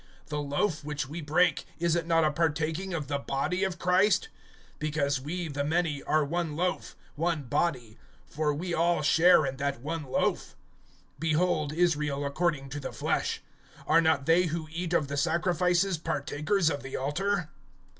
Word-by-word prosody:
The 150 -1 -2
loaf 150 +3 -1
which 145 -2 -3
we 160 +4 -6
break, 160 +3 +2
is 170 0 +1
it 165 -1 -1
not 165 -1 +3
a 155 - +2
partaking 160 +4 -1
of 155 -5 -3
the 140 0 -1
body 140 +8 -1
of 190 -2 -1
Christ? 190 - +3 0.5
(17)Because 145 -3 0
we, 165 +6 -4
the 145 -1 -2
many, 155 -1 0
are 155 -1 +1
one 165 0 -2
loaf, 180 +3 -2 0.2
one 165 -1 -1
body; 120 -4 -1 0.3
for 150 0 -1
we 170 +4 -3
all 170 -1 +2
share 160 +1 +5
in 135 -1 -3
that 140 -2 -2
one 160 +4 -3
loaf. 130 - -1 0.7
(18)Behold 155 -2 +1
Israel 150 -4 +1
according 140 -1 -1
to 145 +2 -5
the 140 - -5
flesh. - - -1 0.4
Are 165 - +5
not 160 -4 +2
they 170 +3 +4
who 160 -1 -3
eat 170 +1 -3
of 155 -4 +2
the 140 +1 -4
sacrifices 175 +2 +1
partakers 160 +3 0
of 145 - -3
the 135 0 -5
altar? 175 +5 -1
160 Hz, 165 wpm, -28 LUFS, 145-175 Hz, 0.7 s, share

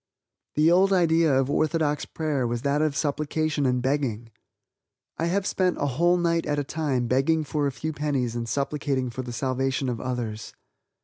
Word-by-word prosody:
The 155 +2 +4
old 190 +3 +4
idea 165 -4 +3
of 135 - +1
orthodox 155 -1 +1
prayer 150 -6 -1
was 120 0 -3
that 140 +1 +1
of 155 -2 +1
supplication 150 0 0
and 125 -1 0
begging. 125 -5 -1 0.9
I 165 - +1
have 190 +3 0
spent 185 -3 +1
a - - 0
whole 170 +7 +2
night 170 -2 0
at 145 0 0
a 145 - 0
time 140 -4 -1
begging 135 +6 +2
for 145 0 -1
a - - -1
few 155 +4 -4
pennies 140 -6 -1
and 115 -1 -3
supplicating 140 -3 -1
for 130 - -4
the 125 -1 -7
salvation 130 +1 -1
of 115 -3 -3
others. 120 -4 -4
145 Hz, 180 wpm, -25 LUFS, 130-160 Hz, 0.9 s, The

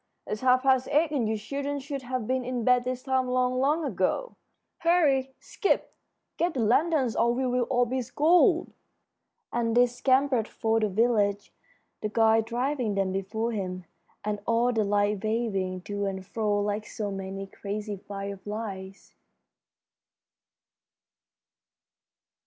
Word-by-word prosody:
It's 210 - -4
half 255 0 +4
past 260 -1 +3
eight, 305 +1 +2
and 250 -7 0
you 220 - 0
children 280 +6 -3
should 275 0 -5
have 255 -2 -3
been 255 +2 0
in 245 -1 -3
bed 250 +1 +3
this 255 0 -3
time 260 -1 +1
long, 255 0 +1
long 300 +4 +2
ago. - - -1 0.4
Hurry! 285 -6 +2
Skip! 400 - -1 0.4
Get 340 -1 0
the - - -1
lanterns 255 +2 +2
or 235 +1 +3
we'll 250 -1 +1
all 245 0 +2
be 255 +2 -2
scolded." 315 +8 +3 0.8
And 235 -1 0
they 245 - +7
scampered 255 -1 +1
for 225 0 0
the 215 -1 +1
village, 205 -1 +1 0.5
the 215 - -2
guide 225 0 +3
driving 245 -1 -1
them 195 -1 0
before 215 +5 -2
him, 185 -4 -4 0.4
and 210 -1 -1
all 235 +2 +2
the 220 -2 +2
lights 205 0 +1
waving 200 -5 -1
to 205 0 -3
and 190 -1 -4
fro 210 0 0
like 210 +1 -2
so 205 -2 -4
many 195 0 -5
crazy 205 +1 -5
fireflies. 200 0 -7
230 Hz, 140 wpm, -27 LUFS, 205-260 Hz, 0.8 s, they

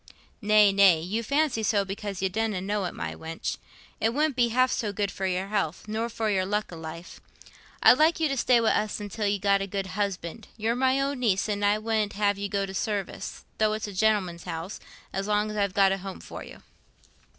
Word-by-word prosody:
"Nay, 210 -1 +5
nay; 195 -4 +6
you 190 +8 -2
fancy 280 0 +1
so 205 -2 +2
because 195 -1 -5
you - - +3
donna 215 0 -1
know 200 +1 -1
it, - - -5
my - - -4
wench. 165 0 -5 0.4
It 225 +2 +1
wouldn't 300 -1 +1
be 245 -2 +3
half 255 +2 +3
so 210 -3 -1
good 200 -1 -2
for 190 +1 -3
your 185 +1 -2
health, 200 -3 -2
nor 220 +2 -2
for 225 -1 -2
your 190 -2 +2
luck 205 +2 -2
i' - - -6
life. 165 +2 -9 0.6
I'd 250 - +8
like 320 +2 +4
you 320 - +2
to 275 - -1
stay 250 -1 +4
wi' 225 -1 +3
us 210 +1 0
till 210 0 -1
you've 200 -1 0
got 200 -1 +3
a 195 - -2
good 195 0 -3
husband: 200 0 -3
you're 225 +2 0
my 260 +1 +2
own 275 -1 -1
niece, 210 -6 +1
and 205 -1 -2
I 205 +1 +4
wouldn't 215 -1 -1
have 200 -1 +1
you 200 0 -3
go 200 0 0
to 190 - -8
service, 200 0 -4
though 215 - +4
it 215 - -3
was - - -6
a 205 - -7
gentleman's 185 -4 +1
house, 165 +5 -5 0.3
as 195 +1 -2
long 210 0 +1
as 210 - -5
I've 200 -2 0
got 195 -1 +5
a 195 - -1
home 190 0 -7
for - - -9
you." - - -13
205 Hz, 230 wpm, -27 LUFS, 195-225 Hz, 0.6 s, I'd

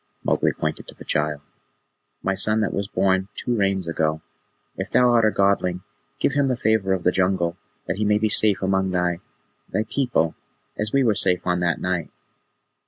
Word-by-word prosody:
Mowgli - - +2
pointed 75 0 -4
to - - -11
the - - -13
child. 75 -1 -1 0.8
"My 95 - +1
son 110 +3 +1
that 105 - -1
was 100 0 -2
born 95 -2 +1
two 120 - -1
Rains 95 -4 0
ago. 80 -1 -1 0.5
If - - -4
thou 125 -1 +4
art 115 -2 +4
a - - +5
Godling, 100 -3 +1 0.3
give - - 0
him 140 0 +2
the 130 - +1
Favour 110 -5 +1
of 95 -2 -2
the 90 - +3
Jungle, 90 -2 0 0.3
that 85 +1 -3
he 105 - 0
may 105 0 +3
be 110 +1 +1
safe 105 -2 +3
among 95 0 +1
thy 90 -1 0 0.5
thy 110 +3 0
people, 125 - 0 0.4
as 105 0 -3
we 140 -1 +3
were 115 -4 +3
safe 90 -3 +2
on 90 -1 +1
that 85 -2 0
night." 90 -3 -2
95 Hz, 190 wpm, -23 LUFS, 90-110 Hz, 0.8 s, a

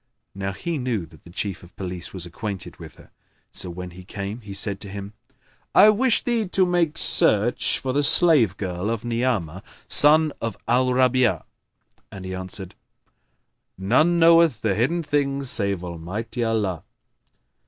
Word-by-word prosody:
Now 95 0 -4
he 165 - -4
knew 120 -8 -2
that 80 -2 -20
the - - -13
Chief 95 +2 -4
of 90 - -17
Police 90 -2 -6
was 90 -3 -7
acquainted 100 +2 -7
with - - -11
her; - - -19 0.4
so, 90 - -2
when 90 +1 -7
he 90 +2 -12
came, 100 +4 -6
he 105 -2 -11
said 100 0 -3
to 100 - -10
him, 100 +1 -8 0.6
"I 210 - +8
wish 230 +2 +2
thee 235 -4 0
to 185 +1 +2
make 175 -3 0
search 110 +4 +3
for 130 -1 -3
the 145 +2 +1
slave 140 - +4
girl 95 +1 -3
of 115 0 -3
Ni'amah 115 -8 -1 0.3
son 155 +1 +5
of 115 - -4
Al 125 +2 +2
Rabi'a." 125 -1 +2 0.7
And 95 -1 -9
he 95 - -5
answered, 95 0 -7 1.0
"None 130 - +2
knoweth 165 -6 +5
the 110 -3 +1
hidden 140 - 0
things 140 -3 0
save 100 -4 -1
Almighty 90 +8 -5
Allah." 105 -7 -1
110 Hz, 160 wpm, -23 LUFS, 95-140 Hz, 1.0 s, I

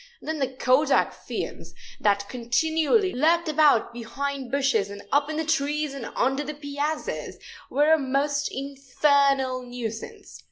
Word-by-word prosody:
Then 315 0 -4
the 270 - +1
kodak 260 +3 +2
fiends, - - -6 0.2
that 200 -1 +1
continually 320 - +1
lurked 330 +5 +2
about 300 -7 +3
behind 270 +3 -4
bushes 270 -8 +1
and 200 0 -9
up 285 +1 +2
in 310 - -3
the 320 - -1
trees 300 -1 0
and 270 -4 -6
under 270 +3 +1
the 300 +1 -6
piazzas, 290 +1 -4 0.3
were 295 +3 +4
a 320 - +4
most 280 +2 0
infernal 275 -1 +1
nuisance. 245 -3 -7
280 Hz, 135 wpm, -25 LUFS, 255-300 Hz, 0.3 s, were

